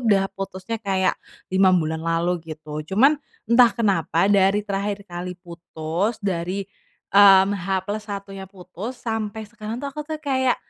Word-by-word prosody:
udah 195 -2 +4
putusnya 195 +3 -5
kayak, 190 -3 +1 0.4
5 190 -1 +5
bulan 160 -1 -1
lalu 165 +2 0
gitu 155 -1 -6
cuman, 275 +10 +4 0.2
entah 235 +2 +6
kenapa 190 -6 +1
dari 200 +1 +3
terakhir 200 0 -3
kali 180 -1 -6
putus 175 +3 -4
dari, 185 +1 -2 0.5
mmm, 195 0 +7
H 190 -1 -2
plus 205 +2 -3
1-nya 195 -1 -7
putus 190 +5 -8
sampai 220 -2 -4
sekarang 215 +1 -7
tuh 280 +2 -5
aku 300 - -5
tuh 315 - -2
kayak, 265 -4 +1
195 Hz, 145 wpm, -23 LUFS, 180-215 Hz, 0.5 s, mmm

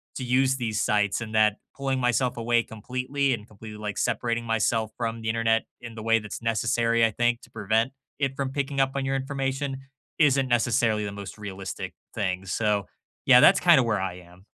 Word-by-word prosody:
to 130 - -4
use 130 +2 +2
these 115 -5 -2
sites 105 0 +1
and 110 -1 -5
that 105 -1 +4 0.2
pulling 135 -1 -1
myself 125 0 +1
away 120 0 +2
completely 130 +5 -2
and 105 -2 -6
completely, 110 0 -11
like, 105 -1 -5
separating 115 -1 -1
myself 115 0 0
from 115 -1 -3
the 110 - -5
Internet, 115 0 +2 0.2
in 120 -2 -9
the 110 - -7
way 115 0 +3
that's 105 0 -7
necessary, 115 +1 +2
I 115 - +1
think, 120 +2 0
to - - -17
prevent 110 +3 0 0.3
it 135 -2 0
from 135 -1 -2
picking 140 0 -2
up 135 0 +3
on 135 -1 -1
your 135 0 0
information, 135 0 -2 0.4
isn't 140 -4 +4
necessarily 115 -3 +2
the 100 - -4
most 100 0 -8
realistic 100 -2 -6 0.2
thing. 95 -2 -2
So, 105 0 0 0.4
yeah, 125 -2 +8
that's 180 +6 +7
kind 170 -5 +6
of 125 - +2
where 110 -3 0
I 95 -2 -3
am. 90 +1 -18
115 Hz, 195 wpm, -26 LUFS, 105-130 Hz, 0.4 s, yeah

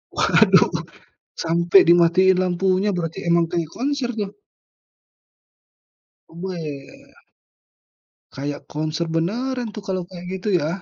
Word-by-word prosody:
Waduh! - - +4 0.7
Sampai 170 +3 +4
dimatiin 175 +2 +5
lampunya 185 +2 +1
berarti 165 +1 -4
emang 170 0 +4
kayak 170 -2 -2
konser 270 -1 -1
tuh. 205 -2 -3 2.0
Weh. 165 -5 -8 1.2
Kayak 145 +1 -4
konser 155 +2 -2
beneran 240 +9 -1
tuh 210 - -7
kalau 185 -1 -1
kayak 180 -1 -10
gitu 185 - -8
ya. 150 - -2
175 Hz, 100 wpm, -21 LUFS, 165-195 Hz, 2.0 s, dimatiin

